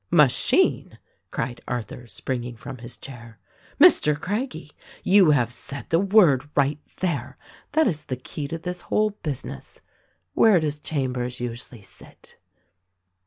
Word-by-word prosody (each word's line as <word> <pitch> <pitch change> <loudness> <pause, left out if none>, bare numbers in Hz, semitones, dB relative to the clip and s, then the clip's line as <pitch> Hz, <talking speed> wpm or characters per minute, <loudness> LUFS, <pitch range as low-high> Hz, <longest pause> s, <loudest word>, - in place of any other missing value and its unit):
'' - - -48
"Machine!" 130 - +1 0.3
cried 120 -1 -4
Arthur, 120 0 -5
springing 125 0 -4
from 125 +3 -9
his 120 0 -10
chair. 115 -4 -11 0.4
''Mr. 150 0 +6
Craggie, 190 - -4 0.3
you 190 -3 +6
have 125 -5 +2
said 140 +2 -5
the 165 - +4
word, 180 - +4
right 140 +1 +2 0.2
there: 185 -2 -2 0.4
that 315 0 +4
is 155 -6 -2
the 130 - -3
key 140 +3 -6
to 165 - -4
this 180 +1 -5
whole 215 0 +1
business. 145 -6 -5 0.5
Where 215 -5 +5
does 150 -2 -2
Chambers 125 -5 -3
usually 120 -2 -6
sit?" - - -15
140 Hz, 135 wpm, -24 LUFS, 125-170 Hz, 0.5 s, Mr